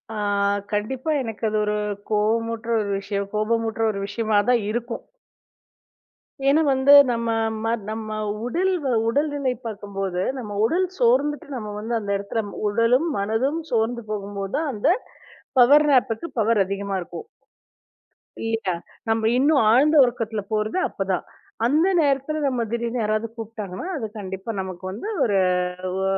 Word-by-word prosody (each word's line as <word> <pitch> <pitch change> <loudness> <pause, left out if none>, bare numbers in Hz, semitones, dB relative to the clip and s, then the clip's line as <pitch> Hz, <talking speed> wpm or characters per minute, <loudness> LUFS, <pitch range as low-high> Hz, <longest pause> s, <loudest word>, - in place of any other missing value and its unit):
ஆ. - - -4 0.5
கண்டிப்பா 245 +8 -1
எனக்கு 225 -3 -6
அது 215 - -1
ஒரு, 210 0 0 0.4
கோவமூட்ற 225 +2 0
ஒரு 205 - -3
விஷயம் 200 0 -3
கோபமூட்ற 225 +1 0
ஒரு 200 - -5
விஷயமாதான் 220 +2 +2
இருக்கும். 235 +1 -3 1.4
ஏன்னா 290 +3 +5
வந்து 265 +2 +5 0.2
நம்ம 230 -1 -1 0.3
ம - - -1 0.2
நம்ம 220 0 -5 0.4
உடல் 370 +10 +1
வ - - -1 0.2
உடல்நிலை 285 0 0
பாக்கும்போது, 195 -4 -3
நம்ம 210 -5 -5
உடல் 350 +10 +2
சோர்ந்துட்டு 275 +6 +2
நம்ம 215 -4 -5
வந்து 225 +3 -4
அந்த 200 -2 -4
எடத்துல 200 +3 -3 0.2
உடலும் 230 +8 +2
மனதும் 225 +10 0
சோர்ந்து 235 +1 0
போகும்போதான், 200 +8 -3
அந்தப் 320 - +1 0.6
பவர் 290 +5 +7
நாப்க்கு 255 +3 +1
பவர் 220 -1 +3
அதிகமா 200 0 -3
இருக்கும். 430 - -8 1.1
இல்லயா! 225 -4 -1 0.4
நம்ம 225 0 +2
இன்னும் 280 +2 +4
ஆழ்ந்த 290 +7 +4
உறக்கத்துல 230 -3 -2
போறது 215 +7 0
அப்பதான். 190 -2 -2 0.4
அந்த 305 +8 +3
நேரத்துல 285 0 +1
நம்ம 250 -3 0
திடீர்னு 235 0 -1
யாராவது 215 +1 0
கூப்ட்டாங்கன்னா, 215 - -6
அது 225 -6 -3
கண்டிப்பா 190 +1 -6
நமக்கு 185 -1 -7
வந்து 215 - -6 0.2
ஒரு 205 -3 +2 0.6
ஒ. - - 0
225 Hz, 130 wpm, -23 LUFS, 210-255 Hz, 1.4 s, பவர்